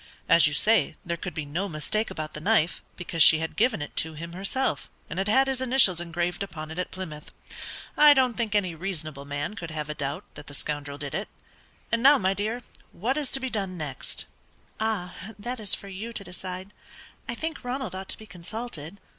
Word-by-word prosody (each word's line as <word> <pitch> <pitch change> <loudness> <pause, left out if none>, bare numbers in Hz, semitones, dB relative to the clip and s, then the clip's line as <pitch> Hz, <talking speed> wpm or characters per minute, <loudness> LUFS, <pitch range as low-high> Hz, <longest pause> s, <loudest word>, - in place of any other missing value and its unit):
"As 170 -1 +8
you 150 - 0
say, 205 -8 +3
there 170 -1 -1
could 175 +1 -6
be 155 - -2
no 175 +8 -2
mistake 215 +8 -1
about 155 -1 -5
the 150 - -4
knife, 175 -3 +3
because 170 -2 -2
she 160 - +10
had 160 0 -3
given 220 -7 +2
it - - -9
to 160 0 +2
him 170 +2 -7
herself, 200 +9 -1 0.2
and 170 - -2
had 195 - 0
had 265 +6 +5
his 265 -1 -1
initials 245 -9 +6
engraved 175 +1 -2
upon 155 -5 -5
it 160 - -5
at 180 - -1
Plymouth. 160 -5 -7 0.7
I 300 -1 +9
don't 255 -2 +4
think 225 -3 -1
any 185 -4 +2
reasonable 155 -5 -4
man 145 +6 -3
could 170 -6 -5
have 155 -1 -4
a - - -1
doubt 140 -1 -3
that 145 - -11
the 145 - -7
scoundrel 145 0 -2
did 145 -2 -5
it; 200 - -2 0.6
and 230 - +2
now, 280 +3 +8
my 190 -3 +2
dear, 215 +5 -2 0.3
what 240 +9 -1
is 290 -3 -1
to 270 - +3
be 260 -1 -3
done 195 -5 -2
next?" 145 -5 -3 0.5
"Ah, 210 -5 -1 0.2
that 240 +4 -4
is 210 -3 +4
for 200 - -10
you 205 +5 -6
to 205 - -5
decide. 185 +1 -7 0.6
I 235 - -1
think 320 +4 -3
Ronald 250 -5 -3
ought 190 0 -6
to - - -2
be 220 - -11
consulted." 180 -2 -6
185 Hz, 215 wpm, -27 LUFS, 160-225 Hz, 0.7 s, she